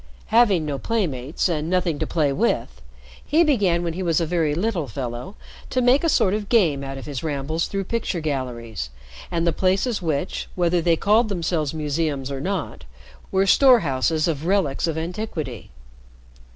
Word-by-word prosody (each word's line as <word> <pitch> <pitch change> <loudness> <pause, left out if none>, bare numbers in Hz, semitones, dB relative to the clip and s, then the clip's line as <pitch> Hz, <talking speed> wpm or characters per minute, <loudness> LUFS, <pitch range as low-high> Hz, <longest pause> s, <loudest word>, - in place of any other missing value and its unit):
Having 205 -9 +4
no 140 -2 -3
playmates 155 - -1
and 160 -2 -2
nothing 175 -4 0
to - - -1
play 150 -4 +1
with, 135 - -1 0.4
he 320 +4 +3
began 200 - +2
when 170 -1 -2
he 185 - -5
was 165 -4 +1
a 165 - 0
very 160 -3 0
little 180 -4 -1
fellow 120 - -5 0.3
to 255 - 0
make 250 +4 +4
a 330 - +3
sort 195 -9 +3
of 210 -1 -3
game 165 - +3
out 135 0 -5
of 135 - -8
his 140 -4 -5
rambles 155 +2 -2
through 195 0 -2
picture 210 -3 -2
galleries, 120 - -4 0.4
and 170 -1 -1
the 170 - +2
places 195 +6 +1
which, 160 0 -2
whether 175 -1 +2
they 165 0 +3
called 215 +5 +3
themselves 170 -6 -1
museums 150 -3 -2
or 135 -1 -4
not, 185 0 -3 0.5
were 195 0 +3
storehouses 165 - +4
or 165 - +2
relics 165 0 0
of 160 -1 -2
antiquity. 160 - -5
165 Hz, 170 wpm, -23 LUFS, 145-195 Hz, 0.5 s, Having